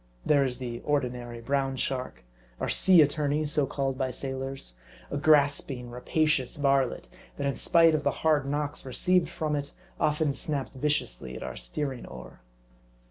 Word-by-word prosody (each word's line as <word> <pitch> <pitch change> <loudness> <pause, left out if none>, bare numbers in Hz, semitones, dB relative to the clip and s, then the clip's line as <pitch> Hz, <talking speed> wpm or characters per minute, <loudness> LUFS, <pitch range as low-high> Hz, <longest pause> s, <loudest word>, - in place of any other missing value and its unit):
There 145 -2 +4
is 125 -2 -2
the 120 -2 -5
ordinary 125 -5 -2
Brown 135 +1 0
Shark, 130 - -3 0.4
or - - -1
sea 180 -4 +6
attorney, 150 +1 0
so 150 -2 +1
called 135 -1 -2
by 130 -1 0
sailors; 135 - -5 0.4
a - - -1
grasping, 140 -4 +2
rapacious 135 +2 0
varlet, 140 -3 +1 0.3
that 140 - -2
in 140 - 0
spite 165 -2 +4
of 155 - +1
the - - +3 0.2
hard 150 -3 +3
knocks 145 0 -2
received 170 +6 +1
from 155 -3 -2
it, 145 0 -4 0.3
often 150 -1 +1
snap 140 -2 -3
ped 130 - -12
viciously 65 - -1
at - - -6
our 65 -1 -6
steering 120 - -4
oar. 65 -2 -11
140 Hz, 160 wpm, -28 LUFS, 125-150 Hz, 0.4 s, sea